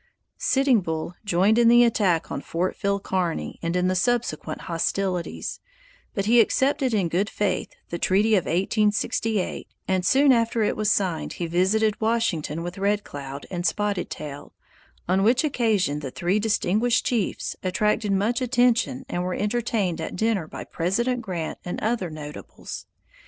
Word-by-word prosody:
Sitting 265 -5 +3
Bull 160 0 -3
joined 200 +3 +3
in 235 - +5
the 240 +1 +7
attack 200 -8 +1
on 140 - -3
Fort 175 +5 -2
Phil 200 -1 0
Kearny 185 -4 -2
and 170 +1 -2
in 180 0 +2
the 185 - +2
subsequent 185 -7 -1
hostilities; 180 +1 -2 0.6
but 195 - -1
he 235 +3 +5
accepted 265 +3 +1
in 200 -6 +1
good 185 +6 0
faith 195 -3 -1 0.2
the 170 - -3
treaty 205 +4 +3
of 190 -5 +3
1868, 210 +2 0 0.2
and 185 -1 +1
soon 275 +8 +5
after 230 -1 +1
it 210 - +1
was 215 -1 0
signed 185 -6 0
he 175 - -4
visited 205 +6 +1
Washington 190 -9 0
with 175 +2 -6
Red 205 +1 +1
Cloud 140 0 -7
and 175 -1 -3
Spotted 205 0 0
Tail, 145 -1 -8 0.5
on 185 +2 +2
which 240 +7 +3
occasion 215 - +1
the 140 -3 -5
three 175 +9 0
distinguished 220 +2 +1
chiefs 230 -6 -1
attracted 210 +3 0
much 210 +6 +1
attention 250 +1 +2
and 175 -10 -2
were 180 0 -2
entertained 210 -5 -1
at - - -5
dinner 210 -4 0
by - - -7
President 235 +9 -1
Grant 175 -7 -4
and 180 - -4
other 220 -5 -1
notables. 150 -1 -8
200 Hz, 155 wpm, -24 LUFS, 175-225 Hz, 0.6 s, the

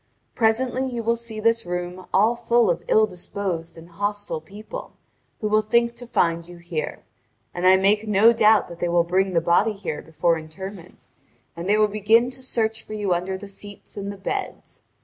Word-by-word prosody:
Presently 250 +3 +1
you 240 -2 -4
will 230 +1 +2
see 230 -2 -7
this 230 +1 +2
room 180 +1 -5
all 220 +5 +4
full 235 -3 +3
of 170 0 -2
ill 220 - +5
disposed 180 -3 -5
and 165 +1 -12
hostile 205 -1 -3
people, 205 +6 -9 0.5
who 215 - 0
will 215 +1 +3
think 235 +2 +2
to 245 - -9
find 170 -6 +1
you 175 0 -11
here; 170 -2 -5 0.5
and 180 +1 +1
I 185 - +8
make 205 +3 +2
no 215 +3 +6
doubt 215 -1 +4
that 170 0 -10
they 175 - 0
will 170 0 +3
bring 185 +2 +1
the 165 - +3
body 175 +6 +3
here 195 -6 -5
before 165 +1 0
interment, 180 +3 -9 0.6
and 170 +3 -5
they 210 - +4
will 215 0 +4
begin 220 +4 +3
to 260 - -9
search 225 -3 -1
for - - -9
you 205 -3 0
under 180 +2 -2
the 200 +2 -9
seats 205 +1 -11
and 200 0 -4
the 200 - -9
beds. 390 - -5
200 Hz, 195 wpm, -23 LUFS, 175-220 Hz, 0.6 s, I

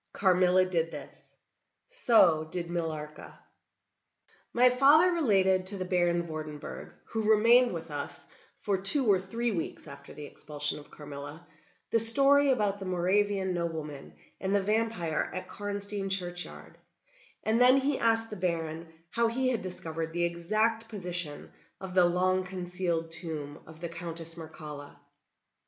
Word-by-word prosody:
Carmilla 185 -1 +3
did 165 -3 -1
this; - - -12 0.5
so 215 - +3
did 170 0 -5
Millarca. 155 -3 -6 1.1
My 250 +1 +4
father 290 +8 +5
related 190 - +1
to 200 +1 +3
the 185 - -4
Baron 175 -1 0
Vordenburg, 155 -2 -8 0.2
who 220 -1 -2
remained 235 +3 +5
with 165 -2 -7
us 145 -1 -7 0.3
for 200 -3 -2
two 255 +8 +6
or 200 -4 +3
three 230 +5 -3
weeks 170 -6 -5
after 140 - -12
the 150 - -9
expulsion 150 0 -1
of 145 - -16
Carmilla, 145 +2 -10 0.5
the 230 - +3
story 275 +5 +9
about 210 -6 0
the 195 - -7
Moravian 190 +1 0
nobleman 160 -5 -6 0.2
and 195 +1 -1
the - - +3
vampire 210 -7 -1
at 185 - -6
Karnstein 205 -1 -5
churchyard, 180 -2 -4 0.6
and 225 +2 +1
then 255 +2 +6
he 275 0 -1
asked 225 -1 +1
the - - -5
Baron 165 -3 -4 0.2
how 235 0 +1
he 255 +3 -1
had 240 -3 -2
discovered 165 -3 -6
the 175 0 -1
exact 215 +7 -1
position 175 -7 -4 0.3
of 190 -1 -8
the 180 -1 +4
long 185 +2 +1
concealed 180 -2 -4
tomb 155 -3 -4
of 160 0 -15
the 170 - -5
Countess 165 -1 -8
Mircalla? 150 -3 -10
185 Hz, 145 wpm, -28 LUFS, 165-215 Hz, 1.1 s, story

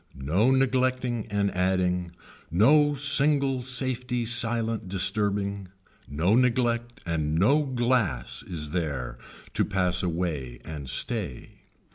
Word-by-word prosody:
No 85 - +1
neglecting 130 -3 +1
and 100 -1 0
adding, 90 -1 0 0.4
no 145 - +4
single 140 -1 +2
safety 125 -1 -2
silent 115 -2 0
disturbing, 100 0 +1 0.4
no 80 +9 +1
neglect 120 -1 0
and 80 -3 -1
no 130 - +4
glass 120 - -1
is 75 -4 -5
there 70 -8 -3 0.4
to - - +2
pass 90 -2 0
away 80 -8 -3
and 75 -5 -6
stay. 60 - 0
105 Hz, 105 wpm, -26 LUFS, 85-125 Hz, 0.4 s, no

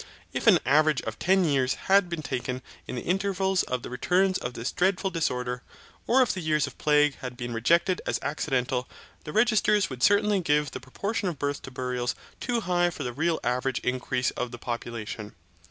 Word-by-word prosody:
If - - -2
an - - +8
average 150 +1 +3
of 110 0 -5
ten 190 0 +3
years 135 -4 +2
had 195 -1 +3
been 170 -3 -4
taken 125 -1 -3 0.2
in - - -5
the 120 - -4
intervals 190 0 +1
of 125 -2 -3
the - - -6
returns 185 +9 +2
of 120 0 -5
this 115 +3 -3
dreadful 190 +1 +1
disorder, 125 -7 -1 0.5
or 260 +2 +5
if 245 - 0
the 185 - -4
years 155 -2 +1
of - - -10
plague 150 -1 +3
had 125 -1 -7
been 120 -1 -4
rejected 170 +10 +2
as - - +1
accidental, 130 -4 -1 0.4
the 150 - -5
registers 210 - +3
would 125 -1 -7
certainly 205 - +4
give 150 -4 +1
the - - -6
proportion 200 - -3
of 170 -4 -3
births 145 +1 -2
to - - -9
burials 125 -1 -2 0.2
too 240 -2 -1
high 175 -2 +2
for 175 - -6
the 125 - -3
real 160 +4 0
average 125 +2 0
increase 125 0 0
of 125 - -3
the 120 - -8
population. 115 -3 -5
150 Hz, 195 wpm, -27 LUFS, 125-185 Hz, 0.5 s, an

